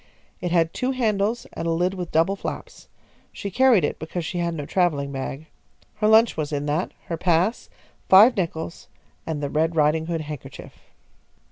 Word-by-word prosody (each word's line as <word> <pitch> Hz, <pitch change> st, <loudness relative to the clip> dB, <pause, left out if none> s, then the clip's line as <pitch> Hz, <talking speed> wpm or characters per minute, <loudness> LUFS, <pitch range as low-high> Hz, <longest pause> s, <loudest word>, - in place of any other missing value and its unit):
It 175 Hz, -, -3 dB
had 165 Hz, -2 st, +2 dB
two 255 Hz, +1 st, -1 dB
handles 220 Hz, -2 st, 0 dB
and 165 Hz, -, -4 dB
a -, -, +1 dB
lid 175 Hz, +3 st, +1 dB
with 180 Hz, -3 st, -6 dB
double 165 Hz, +5 st, +2 dB
flaps. -, -, -7 dB, 0.4 s
She 200 Hz, -, -6 dB
carried 250 Hz, -4 st, +4 dB
it -, -, -2 dB
because 160 Hz, +2 st, -5 dB
she 175 Hz, -, -3 dB
had 170 Hz, -1 st, -1 dB
no 145 Hz, -3 st, -5 dB
travelling 150 Hz, -7 st, 0 dB
bag. 135 Hz, +2 st, -5 dB, 0.5 s
Her 210 Hz, 0 st, +1 dB
lunch 220 Hz, +2 st, +5 dB
was 155 Hz, -1 st, -3 dB
in 145 Hz, -1 st, -2 dB
that, 150 Hz, +5 st, -1 dB
her 165 Hz, -, -4 dB
pass, 175 Hz, +6 st, +1 dB, 0.4 s
five 215 Hz, +6 st, +8 dB
nickels, 165 Hz, -3 st, -4 dB, 0.4 s
and 155 Hz, -3 st, -3 dB
the 140 Hz, -, -1 dB
Red 160 Hz, +2 st, 0 dB
Ridinghood 160 Hz, +2 st, +1 dB
handkerchief. 150 Hz, -3 st, -9 dB
170 Hz, 170 wpm, -23 LUFS, 155-195 Hz, 0.5 s, five